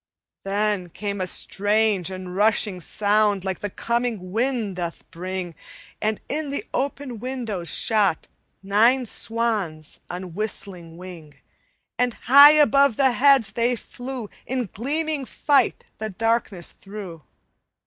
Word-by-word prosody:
"Then 200 Hz, -2 st, 0 dB
came 200 Hz, +2 st, -4 dB
a 185 Hz, -, -1 dB
strange 205 Hz, -1 st, +1 dB
and 185 Hz, -1 st, -7 dB
rushing 210 Hz, -2 st, +2 dB
sound 205 Hz, +1 st, +1 dB
Like 190 Hz, -2 st, -2 dB
the 205 Hz, -, -4 dB
coming 235 Hz, -4 st, -2 dB
wind 225 Hz, -3 st, -1 dB
doth 170 Hz, -2 st, -5 dB
bring, 180 Hz, 0 st, -5 dB, 0.5 s
And 215 Hz, 0 st, 0 dB
in 300 Hz, 0 st, -2 dB
the 280 Hz, -, -3 dB
open 275 Hz, -3 st, -3 dB
windows 230 Hz, -8 st, -3 dB
shot 205 Hz, -7 st, +1 dB, 0.4 s
Nine 230 Hz, +6 st, +3 dB
swans 215 Hz, -10 st, -2 dB
on 180 Hz, -1 st, -6 dB
whistling 180 Hz, -4 st, -4 dB
wing, 170 Hz, -5 st, -11 dB, 0.6 s
And 245 Hz, -2 st, +1 dB
high 280 Hz, +4 st, +8 dB
above 280 Hz, -4 st, +4 dB
the 265 Hz, 0 st, +3 dB
heads 265 Hz, -3 st, +4 dB
they 240 Hz, +1 st, +1 dB
flew, 245 Hz, 0 st, -7 dB, 0.2 s
In 255 Hz, -1 st, -1 dB
gleaming 300 Hz, +5 st, -1 dB
fight 280 Hz, -6 st, +1 dB, 0.2 s
the 220 Hz, 0 st, -3 dB
darkness 225 Hz, -3 st, -1 dB
through. 195 Hz, -5 st, -9 dB
215 Hz, 125 wpm, -23 LUFS, 185-245 Hz, 0.6 s, high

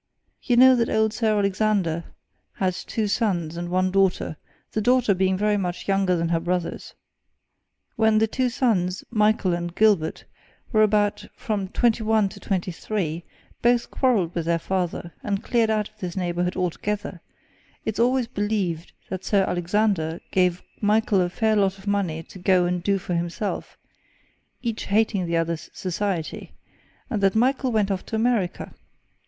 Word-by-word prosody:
You 245 Hz, -2 st, +1 dB
know 260 Hz, +1 st, +8 dB
that 230 Hz, -1 st, +1 dB
old 220 Hz, 0 st, +2 dB
Sir 220 Hz, -2 st, +1 dB
Alexander 200 Hz, -4 st, +1 dB, 0.5 s
had 185 Hz, -1 st, 0 dB
two 215 Hz, +4 st, -3 dB
sons 180 Hz, -7 st, 0 dB
and 175 Hz, 0 st, -4 dB
one 185 Hz, +1 st, +1 dB
daughter 190 Hz, -4 st, +1 dB, 0.4 s
the 215 Hz, -, -1 dB
daughter 245 Hz, -1 st, +3 dB
being 190 Hz, 0 st, +1 dB
very 210 Hz, +1 st, +2 dB
much 180 Hz, -3 st, -3 dB
younger 195 Hz, -2 st, +2 dB
than 165 Hz, -1 st, -1 dB
her 170 Hz, -1 st, +2 dB
brothers. 175 Hz, 0 st, -3 dB, 1.0 s
When 220 Hz, -1 st, +4 dB
the 220 Hz, -, +4 dB
two 250 Hz, +3 st, 0 dB
sons, 195 Hz, -8 st, 0 dB
Michael 210 Hz, -4 st, +2 dB
and 175 Hz, 0 st, -3 dB
Gilbert, 205 Hz, -7 st, +2 dB, 0.5 s
were 215 Hz, -, +4 dB
about 210 Hz, -1 st, +2 dB
from 205 Hz, -3 st, -2 dB
twenty 230 Hz, +3 st, +1 dB
one 220 Hz, -2 st, +2 dB
to -, -, -12 dB
twenty 185 Hz, -2 st, -2 dB
three, 170 Hz, -3 st, -3 dB, 0.4 s
both 240 Hz, 0 st, +2 dB
quarrelled 210 Hz, -10 st, +1 dB
with 165 Hz, -2 st, -3 dB
their 170 Hz, 0 st, +2 dB
father, 175 Hz, -1 st, -3 dB
and 200 Hz, -1 st, -2 dB
cleared 230 Hz, -3 st, +2 dB
out 215 Hz, -1 st, 0 dB
of 215 Hz, -, -33 dB
this 180 Hz, -2 st, -5 dB
neighbourhood 180 Hz, 0 st, -1 dB
altogether; 185 Hz, +1 st, -3 dB, 0.6 s
it's 220 Hz, 0 st, -2 dB
always 250 Hz, +1 st, +3 dB
believed 200 Hz, -6 st, -2 dB, 0.2 s
that 190 Hz, -1 st, -4 dB
Sir 200 Hz, -2 st, +2 dB
Alexander 175 Hz, -2 st, 0 dB
gave 180 Hz, -1 st, +2 dB, 0.2 s
Michael 210 Hz, -2 st, +3 dB
a 175 Hz, -, +1 dB
fair 220 Hz, +4 st, +1 dB
lot 195 Hz, -2 st, +2 dB
of 190 Hz, -, -15 dB
money 190 Hz, -6 st, -1 dB
to 185 Hz, -, -13 dB
go 180 Hz, 0 st, +3 dB
and 180 Hz, 0 st, -1 dB
do 200 Hz, +2 st, +1 dB
for 180 Hz, -1 st, -4 dB
himself, 175 Hz, +4 st, -3 dB, 0.9 s
each 230 Hz, -2 st, -3 dB
hating 200 Hz, -3 st, +1 dB
the 170 Hz, 0 st, 0 dB
other's 165 Hz, -1 st, -2 dB
society, 185 Hz, -2 st, -3 dB, 0.5 s
and 225 Hz, -6 st, -2 dB
that 195 Hz, +1 st, +3 dB
Michael 255 Hz, +2 st, +2 dB
went 210 Hz, -3 st, +1 dB
off 190 Hz, -1 st, -2 dB
to -, -, -3 dB
America. 220 Hz, -5 st, 0 dB
195 Hz, 160 wpm, -24 LUFS, 180-220 Hz, 1.0 s, know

